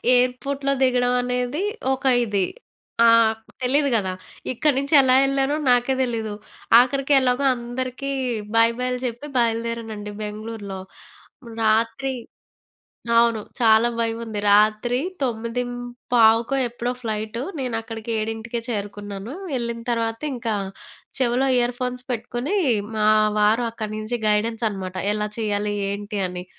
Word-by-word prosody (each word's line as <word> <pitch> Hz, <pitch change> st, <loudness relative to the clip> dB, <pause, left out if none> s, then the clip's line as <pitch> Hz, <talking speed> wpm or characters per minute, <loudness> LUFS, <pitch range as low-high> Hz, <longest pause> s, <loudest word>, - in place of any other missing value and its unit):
ఎయిర్‌పోర్ట్‌లో 275 Hz, +3 st, 0 dB
దిగడం 250 Hz, -1 st, +2 dB
అనేది 250 Hz, +6 st, -1 dB, 0.3 s
ఒక 265 Hz, -, -5 dB, 0.2 s
ఇది. 200 Hz, -4 st, +1 dB, 0.6 s
ఆ! -, -, +7 dB, 0.6 s
తెలీదు 280 Hz, +3 st, +3 dB
గదా! 190 Hz, -4 st, 0 dB, 0.4 s
ఇక్కడి 280 Hz, +3 st, +1 dB
నుంచి 280 Hz, +3 st, -3 dB
ఎలా 255 Hz, -1 st, +4 dB
వెళ్ళానో 275 Hz, +1 st, +1 dB
నాకే 245 Hz, +2 st, +3 dB
తెలీదు. 225 Hz, -4 st, -2 dB, 0.5 s
ఆఖరికి 275 Hz, +3 st, +2 dB
ఎలాగో 250 Hz, +2 st, +1 dB
అందరికి 255 Hz, +3 st, -4 dB, 0.4 s
బై 230 Hz, 0 st, +6 dB
బైలు 250 Hz, 0 st, -1 dB
చెప్పి 245 Hz, +5 st, -4 dB
బయలుదేరానండి 230 Hz, -2 st, -1 dB
బెంగుళూరులో. 210 Hz, -2 st, -6 dB, 0.8 s
రాత్రి 230 Hz, +5 st, +1 dB, 1.1 s
అవును. 230 Hz, -2 st, +3 dB, 0.2 s
చాలా 225 Hz, 0 st, +5 dB
భయం 230 Hz, 0 st, -1 dB
ఉంది. 220 Hz, -2 st, -4 dB
రాత్రి 215 Hz, +4 st, +3 dB, 0.2 s
9:15కో 245 Hz, 0 st, +1 dB
ఎప్పుడో 240 Hz, +1 st, -3 dB
ఫ్లైట్ 220 Hz, 0 st, -3 dB, 0.2 s
నేను 250 Hz, -3 st, -2 dB
అక్కడికి 225 Hz, 0 st, -8 dB
7:00కే 225 Hz, +2 st, -3 dB
చేరుకున్నాను. 205 Hz, +1 st, -5 dB, 0.2 s
వెళ్ళిన 235 Hz, -2 st, -2 dB
తర్వాత 225 Hz, -1 st, -1 dB, 0.2 s
ఇంకా 230 Hz, -2 st, -2 dB, 0.7 s
చెవిలో 255 Hz, +1 st, +2 dB
ఇయర్ 245 Hz, 0 st, +1 dB
ఫోన్స్ 250 Hz, 0 st, -3 dB
పెట్టుకొని 240 Hz, -, -3 dB, 0.4 s
మా 215 Hz, 0 st, +2 dB, 0.3 s
వారు 215 Hz, +3 st, +3 dB
అక్కడి 215 Hz, -2 st, -5 dB
నుంచి 215 Hz, +3 st, -3 dB
గైడెన్స్ 225 Hz, +2 st, +1 dB
అన్నమాట. 190 Hz, -2 st, -6 dB, 0.2 s
ఎలా 210 Hz, 0 st, -1 dB
చేయాలి. 210 Hz, -1 st, -1 dB, 0.2 s
ఏంటి 205 Hz, 0 st, -4 dB
అని. 180 Hz, 0 st, -7 dB
235 Hz, 115 wpm, -23 LUFS, 215-250 Hz, 1.1 s, ఆ